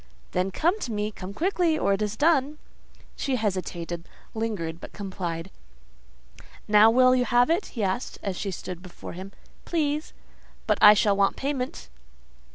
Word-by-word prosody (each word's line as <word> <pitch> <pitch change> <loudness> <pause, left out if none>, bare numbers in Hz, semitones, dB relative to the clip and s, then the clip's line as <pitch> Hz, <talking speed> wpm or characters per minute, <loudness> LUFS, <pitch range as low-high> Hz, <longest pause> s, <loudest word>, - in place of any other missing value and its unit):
"Then 180 +1 0
come 345 - +1
to 250 - -4
me. 210 0 -2
Come 190 -2 -8
quickly, 340 - +1
or 200 - +2
it 195 - -1
is 210 +1 -2
done." 300 -2 +2 0.6
She 270 - -1
hesitated, 180 -6 -3 0.2
lingered, 190 -7 -3
but - - -10
complied. 180 -4 -5 1.2
"Now, 210 +1 +7
will 255 +2 +5
you 250 - +2
have 245 +4 +3
it?" 350 +5 +1
he 225 - -4
asked, 195 +6 -2
as 195 -2 -2
she 200 - -3
stood 180 -1 -6
before 180 -1 -10
him. 190 +3 -8 0.3
"Please." 305 -2 -1 0.5
"But - - +1
I 210 0 +10
shall 205 -1 +3
want 195 0 +2
payment." 270 - -3
210 Hz, 160 wpm, -26 LUFS, 190-265 Hz, 1.2 s, I